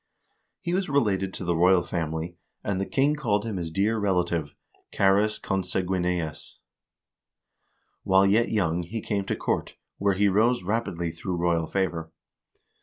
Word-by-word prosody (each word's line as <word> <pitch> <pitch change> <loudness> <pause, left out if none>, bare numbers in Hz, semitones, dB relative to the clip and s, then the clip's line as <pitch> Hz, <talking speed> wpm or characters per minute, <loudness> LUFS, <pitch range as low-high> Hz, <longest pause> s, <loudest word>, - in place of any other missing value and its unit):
He 175 -2 -2
was 190 -1 0
related 100 -9 +1
to 90 - -4
the 85 0 +1
royal 90 +1 +4
family, 80 0 -3 0.3
and 100 -2 -1
the 95 - -2
king 140 +2 +2
called 110 -7 0
him 110 -4 -3
his 85 -2 -3
dear 100 +7 +1
relative 85 -6 0 0.4
(earns 100 +2 +4
consanguineus). 90 -3 -2 1.4
While 95 0 +4
yet 110 +4 +3
young 90 -5 +1
he 105 +7 -5
came 100 -2 -2
to - - -1
court, - - -2 0.2
where 100 -1 +2
he 100 +2 +3
rose 110 +4 +3
rapidly 90 -5 -1
through 85 +2 -4
royal 85 -2 +1
favor. 85 -3 -2
95 Hz, 145 wpm, -26 LUFS, 85-105 Hz, 1.4 s, royal